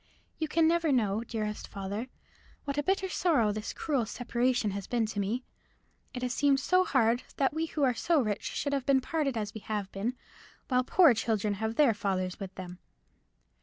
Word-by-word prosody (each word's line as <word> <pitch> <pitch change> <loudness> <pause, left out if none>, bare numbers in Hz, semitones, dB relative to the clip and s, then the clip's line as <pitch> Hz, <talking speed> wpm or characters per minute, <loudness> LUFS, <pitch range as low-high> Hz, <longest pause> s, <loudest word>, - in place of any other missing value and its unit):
You 315 - 0
can 320 +1 +3
never 335 -2 +2
know, 220 -4 +1
dearest 215 -2 -4
father, 200 +4 -5 0.6
what 285 0 -1
a - - +3
bitter 380 +5 0
sorrow 295 - +2
this 215 +1 -4
cruel 275 -8 -1
separation 245 -2 0
has 200 0 -5
been 235 -2 +1
to 215 -1 -4
me. 220 +6 -1 0.7
It 250 - -6
has 250 0 -1
seemed 280 0 +3
so 365 +6 +3
hard 240 -6 +2 0.2
that 270 0 +2
we 320 +1 -1
who 305 -2 -2
are 255 -2 +4
so 325 +6 +2
rich 215 -6 -1
should 285 - -2
have 275 -2 -1
been 275 -1 +5
parted 285 -4 -1
as 210 -1 -3
we 220 - -7
have 205 -3 -3
been, 220 +6 -2 0.5
while 255 -1 +3
poor 325 +1 +6
children 215 -2 0
have 220 +1 -1
their 280 -5 +5
fathers 190 -3 -2
with 195 -2 -7
them. 180 -1 -8
240 Hz, 195 wpm, -30 LUFS, 210-285 Hz, 0.7 s, poor